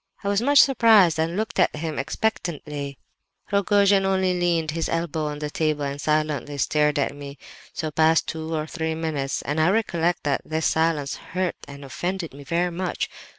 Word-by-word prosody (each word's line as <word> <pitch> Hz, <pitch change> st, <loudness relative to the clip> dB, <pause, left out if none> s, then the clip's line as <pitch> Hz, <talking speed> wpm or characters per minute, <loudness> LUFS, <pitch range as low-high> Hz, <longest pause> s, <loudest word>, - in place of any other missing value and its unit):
"I 200 Hz, -, -1 dB
was 200 Hz, +1 st, +1 dB
much 285 Hz, +4 st, +3 dB
surprised, 220 Hz, -, +5 dB
and 165 Hz, +3 st, -1 dB
looked 220 Hz, +2 st, -2 dB
at -, -, +3 dB
him 155 Hz, -1 st, -4 dB
expectantly. 150 Hz, -4 st, -3 dB, 0.5 s
"Rogojin 200 Hz, 0 st, +3 dB
only 190 Hz, -1 st, +1 dB
leaned 170 Hz, -3 st, +1 dB
his 165 Hz, +1 st, -2 dB
elbow 165 Hz, -2 st, -2 dB
on 150 Hz, 0 st, -4 dB
the 150 Hz, 0 st, -5 dB
table 155 Hz, -2 st, 0 dB
and 140 Hz, 0 st, -4 dB
silently 150 Hz, -2 st, -1 dB
stared 150 Hz, +1 st, +1 dB
at 140 Hz, 0 st, 0 dB
me. 140 Hz, 0 st, -9 dB, 0.4 s
So 155 Hz, -2 st, -3 dB
passed 160 Hz, +1 st, +3 dB
two 160 Hz, 0 st, -4 dB
or 155 Hz, -1 st, -2 dB
three 160 Hz, 0 st, -3 dB
minutes, 150 Hz, -4 st, -2 dB
and 150 Hz, +2 st, -1 dB
I 160 Hz, -, +4 dB
recollect 175 Hz, -5 st, 0 dB
that 140 Hz, -2 st, 0 dB
his 160 Hz, 0 st, -1 dB
silence 160 Hz, -3 st, +1 dB
hurt 185 Hz, 0 st, -3 dB
and 140 Hz, 0 st, -10 dB
offended 175 Hz, +4 st, -4 dB
me 140 Hz, +1 st, -11 dB
very 170 Hz, +4 st, 0 dB
much. 180 Hz, +1 st, -3 dB
160 Hz, 180 wpm, -24 LUFS, 150-180 Hz, 0.5 s, surprised